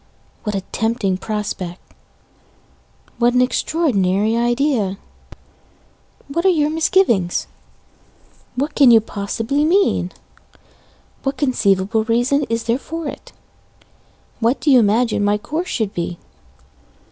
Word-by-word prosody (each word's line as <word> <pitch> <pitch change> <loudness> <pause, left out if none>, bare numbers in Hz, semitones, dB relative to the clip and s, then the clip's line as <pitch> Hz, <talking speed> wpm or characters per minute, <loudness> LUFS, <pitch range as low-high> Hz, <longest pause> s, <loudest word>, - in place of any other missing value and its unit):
What 210 -2 -3
a 195 - -1
tempting 220 -5 -1
prospect! 200 -4 -4 1.4
What 240 0 +3
an 250 - +4
extraordinary 220 - +1
idea! 240 -4 0 1.3
What 335 +5 -2
are 380 - +5
your 305 -4 +2
misgivings? 315 - +2 1.1
What 280 +5 -2
can 275 -4 +6
you 230 -1 +8
possibly 225 +7 -2
mean? 375 +6 +2 1.1
What 270 0 -2
conceivable 220 -5 +1
reason 245 +5 +1
is 230 0 -1
there 230 +2 0
for 325 +1 -6
it? - - -8 1.1
What 235 +4 +1
do 295 - +2
you 255 - +7
imagine 220 0 +2
my 205 0 +2
course 315 - -4
should 220 -4 -2
be? 170 0 -4
235 Hz, 110 wpm, -19 LUFS, 205-280 Hz, 1.4 s, you